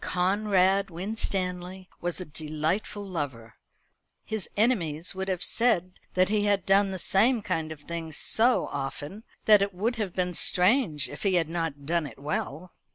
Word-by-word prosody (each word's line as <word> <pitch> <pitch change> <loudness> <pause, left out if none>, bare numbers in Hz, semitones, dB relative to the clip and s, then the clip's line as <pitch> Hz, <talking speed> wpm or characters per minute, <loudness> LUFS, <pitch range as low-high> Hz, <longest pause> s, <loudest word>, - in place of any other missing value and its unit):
Conrad 195 +1 +2
Winstanley 185 -1 -2
was 175 +1 -2
a 185 - -5
delightful 160 +7 -2
lover. 130 - -5 0.7
His 220 -4 -4
enemies 180 -8 +1
would 190 0 -4
have 185 -2 -1
said 185 -7 +1 0.2
that 185 0 +4
he 210 -1 +1
had 200 -2 +2
done 195 +1 +4
the 190 - -4
same 220 +6 +3
kind 160 -4 -2
of 155 -2 -8
thing 165 +1 -6
so 235 +9 +2
often, 145 +8 -5 0.2
that 210 -2 +7
it 200 -1 -1
would 225 +6 -1
have 205 -5 -3
been 180 -1 0
strange 180 - +3
if 145 - -9
he 195 -3 +2
had 165 -3 +1
not 165 -4 -3
done 165 0 0
it 120 - -12
well. 150 +4 -4
185 Hz, 160 wpm, -27 LUFS, 160-200 Hz, 0.7 s, that